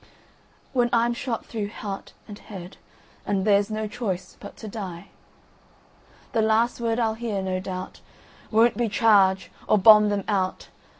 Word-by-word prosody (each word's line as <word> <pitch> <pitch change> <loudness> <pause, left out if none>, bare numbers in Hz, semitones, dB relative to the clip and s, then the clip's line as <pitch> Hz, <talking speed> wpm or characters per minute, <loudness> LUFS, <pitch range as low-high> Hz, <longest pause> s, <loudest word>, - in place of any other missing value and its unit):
…"When 245 -2 +2
I'm 235 0 +2
shot 235 -1 -4
through 210 -3 -4
heart 200 -2 -7
and 205 -2 -10
head, 185 -3 -10 0.5
And 195 -1 -1
there's 205 0 +3
no 215 0 -3
choice 195 -5 -4
but 200 - -11
to 220 - -8
die, 190 -5 -7 1.2
The 225 - +1
last 225 +2 +2
word 230 -1 0
I'll 225 -2 +1
hear, 220 -3 -3
no 185 -1 -2
doubt, 185 0 -7 0.5
Won't 230 +2 +3
be 235 -2 0
"Charge!" 200 -3 +3 0.2
or 215 - +4
"Bomb 210 +1 +7
them 205 -1 -1
out!" 190 -3 -1
210 Hz, 155 wpm, -25 LUFS, 195-225 Hz, 1.2 s, Bomb